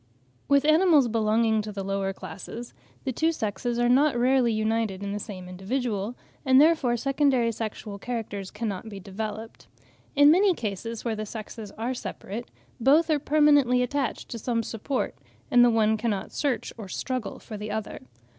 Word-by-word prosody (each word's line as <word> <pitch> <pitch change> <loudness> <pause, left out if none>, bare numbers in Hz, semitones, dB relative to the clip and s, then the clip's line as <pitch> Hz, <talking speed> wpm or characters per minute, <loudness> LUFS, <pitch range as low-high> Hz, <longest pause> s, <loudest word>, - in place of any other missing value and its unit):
With 280 0 +4
animals 310 -3 +5
belonging 220 0 +2
to 210 0 -6
the 200 -1 -5
lower 195 0 -1
classes, 230 +5 -8 0.3
the 265 - -1
two 320 +6 +1
sexes 235 -2 -2
are 240 0 +2
not 265 +1 +4
rarely 250 0 +3
united 215 -2 -1
in 200 - -3
the 205 - -3
same 185 -3 -8
individual, 210 +3 -3 0.3
and 260 -2 +5
therefore 295 -6 +4
secondary 270 -2 +2
sexual 215 -2 -5
characters 205 -5 -4
cannot 210 -1 -4
be 200 -2 -8
developed. 215 +3 -6 0.5
In 290 +1 +7
many 375 +2 +4
cases 225 +1 -5
where 225 -2 0
the 215 0 -5
sexes 215 0 -7
are 235 +4 -3
separate, 225 0 -6 0.3
both 300 +7 +4
are 300 - +3
permanently 290 -4 +4
attached 275 +2 -2
to 230 - -5
some 230 0 -1
support, 235 +5 -3 0.4
and 245 -2 +7
the 245 - +6
one 220 -1 +3
cannot 210 -3 -2
search 280 -4 -2
or 210 - -6
struggle 255 +4 -4
for 220 - -9
the 210 +1 -6
other. 215 0 -4
230 Hz, 165 wpm, -26 LUFS, 210-260 Hz, 0.5 s, In